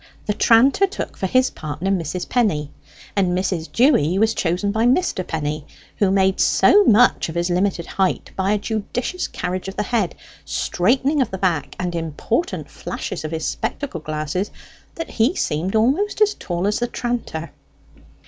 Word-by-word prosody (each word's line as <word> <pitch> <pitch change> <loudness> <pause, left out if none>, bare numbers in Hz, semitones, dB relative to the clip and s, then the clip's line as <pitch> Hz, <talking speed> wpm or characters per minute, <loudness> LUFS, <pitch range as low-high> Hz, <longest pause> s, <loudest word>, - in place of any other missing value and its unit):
The 210 - 0
tranter 255 - +4
took 385 - -6
for 190 - -2
his 255 +6 +3
partner 155 +5 -4
Mrs. 180 -1 -2
Penny, 165 - 0 0.4
and 180 -3 +2
Mrs. 180 -3 -2
Dewy 230 - +3
was 220 +2 +3
chosen 180 +4 0
by 220 +3 +2
Mr. 250 - +1
Penny, 155 -1 -3 0.3
who 200 - +3
made 190 0 +2
so 415 - +5
much 230 -4 +4
of 160 - -7
his 175 +1 0
limited 180 -1 0
height 190 -1 -1
by 195 +2 +1
a - - +2
judicious 225 - -3
carriage 180 +1 -4
of 195 - -6
the 210 - -1
head, 210 -4 -1 0.3
straightening 265 - +1
of 250 - 0
the 190 - -5
back, 175 -6 -1
and 180 -1 -2
important 170 - -2
flashes 175 - -6
of 155 - -3
his 160 0 -3
spectacle 275 -12 -3
glasses, 155 +6 -3 0.5
that 330 - -5
he 240 +10 +2
seemed 170 +7 -1
almost 280 - +2
as 420 -1 +4
tall 175 +1 -3
as 210 +1 +1
the 240 - 0
tranter. 235 -10 -4
195 Hz, 165 wpm, -21 LUFS, 170-240 Hz, 0.5 s, so